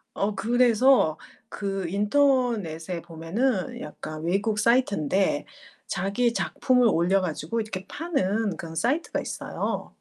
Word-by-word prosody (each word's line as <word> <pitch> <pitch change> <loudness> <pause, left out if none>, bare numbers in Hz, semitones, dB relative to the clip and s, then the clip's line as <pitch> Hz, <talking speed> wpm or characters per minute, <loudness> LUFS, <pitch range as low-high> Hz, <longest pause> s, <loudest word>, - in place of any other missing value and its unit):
어 200 +1 0
그래서 240 - +4 0.3
그 195 -3 -3
인터넷에 205 - +1
보면은 180 +7 -2
약간 155 +1 -7
외국 200 +5 0
사이트인데 200 - +2 0.4
자기 235 +5 0
작품을 250 -1 +2
올려 190 +1 +3
가지고 175 +5 -2
이렇게 195 -3 -6
파는 220 - -1
그런 165 -1 -8
사이트가 260 - 0
있어요. - - -4
200 Hz, 270 characters per minute, -26 LUFS, 170-245 Hz, 0.4 s, 그래서